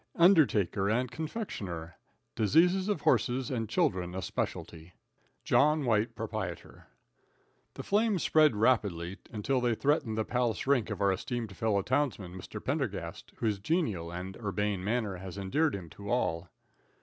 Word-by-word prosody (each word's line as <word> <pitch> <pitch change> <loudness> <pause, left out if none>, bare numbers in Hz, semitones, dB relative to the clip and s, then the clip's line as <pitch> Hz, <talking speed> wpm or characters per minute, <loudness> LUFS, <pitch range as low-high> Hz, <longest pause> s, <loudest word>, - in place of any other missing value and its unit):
Undertaker 125 - +4
and 125 +3 0
Confectioner. 100 - -5 0.4
Diseases 175 - +3
of 200 -8 0
Horses 130 0 +1
and 115 -4 -2
Children 90 -4 0
a 95 - -3
Specialty. 85 0 -4 0.5
Jno. 150 0 +3
White, 110 -2 +1
Ptr. - - -5 0.9
The - - -6
flames 205 -3 +1
spread 155 -6 +4
rapidly, 100 -6 +1
until 125 +4 0
they 120 -2 +2
threatened 135 -5 +1
the 110 - 0
Palace 120 -2 -1
rink 135 -5 +2
of - - -4
our 100 -1 +4
esteemed 110 +1 -4
fellow 100 +1 +1
townsman, 125 -9 -1
Mr. 95 +3 -7
Pendergast, 110 - -3
whose 105 -3 -1
genial 105 - -1
and 90 +2 -6
urbane 105 -3 -2
manner 105 -2 -1
has 95 +1 -8
endeared 140 +10 +1
him 90 -4 -7
to 100 0 -9
all. 90 -7 0
110 Hz, 140 wpm, -30 LUFS, 95-140 Hz, 0.9 s, Undertaker